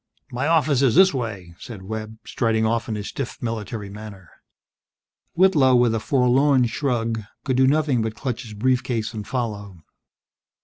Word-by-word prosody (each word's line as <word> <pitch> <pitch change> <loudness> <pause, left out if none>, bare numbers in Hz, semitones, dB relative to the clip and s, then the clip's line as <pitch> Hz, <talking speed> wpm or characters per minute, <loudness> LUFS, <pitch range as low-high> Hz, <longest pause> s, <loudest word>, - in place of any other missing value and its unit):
"My 125 +4 -2
office 155 -4 +2
is 130 -5 +3
this 190 +2 +6
way," 100 -9 -5
said 105 -6 -9
Webb, 110 +2 -6
striding 110 -2 0
off 115 +1 -1
in 110 - -2
a 105 - -5
stiff 125 +4 -6
military 110 -2 -4
manner. 100 -4 -11 1.0
Whitlow, 155 -8 +4
with 120 -2 +3
a 115 - 0
forlorn 130 +2 +3
shrug, 115 -2 -1 0.2
could 130 -2 -1
do 130 0 +5
nothing 140 -4 +2
but 110 0 -3
clutch 125 -2 -4
his 110 -4 -10
brief 125 +4 +1
case 115 -3 -3
and 105 -2 -6
follow. 105 -7 -4
115 Hz, 165 wpm, -23 LUFS, 110-130 Hz, 1.0 s, this